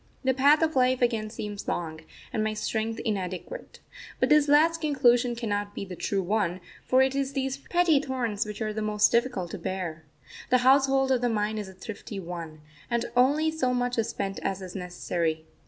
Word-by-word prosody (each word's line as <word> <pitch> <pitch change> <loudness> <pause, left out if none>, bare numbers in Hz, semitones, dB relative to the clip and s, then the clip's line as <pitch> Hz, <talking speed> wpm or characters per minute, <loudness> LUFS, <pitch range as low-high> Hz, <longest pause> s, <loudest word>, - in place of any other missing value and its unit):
The 260 0 +3
path 285 +5 +5
of 315 -2 0
life 255 0 +3
again 225 -3 0
seems 210 -2 -6
long, 160 -2 -3 0.3
and 215 - 0
my 215 0 -1
strength 220 +1 -2
inadequate. 195 - -4 0.4
But - - +2
this 300 -1 +5
last 320 +3 +4
conclusion 245 -5 +3
cannot 205 -3 -3
be - - -4
the 185 -1 -8
true 195 +3 -1
one, 185 -2 0 0.3
for 260 +1 +5
it 265 0 +1
is 275 0 -1
these 270 0 -2
petty 340 +1 +2
thorns 250 -7 -2
which 210 +1 -5
are 215 0 -2
the 215 - -3
most 210 0 +3
difficult 235 -7 0
to 205 - -6
bear. 170 -3 -4 0.5
The 255 - +5
household 270 0 +4
of 255 -2 +2
the 245 - +1
mind 215 -1 -1
is 205 -2 -6
a - - -12
thrifty 200 +1 -7
one, 165 -4 -7 0.3
and 235 0 0
only 290 +6 +3
so 255 -6 0
much 245 -1 0
is 225 0 0
spent 195 -4 -3
as 195 -1 -2
is 180 -1 -9
necessary. 170 -3 -2
225 Hz, 195 wpm, -27 LUFS, 195-265 Hz, 0.5 s, path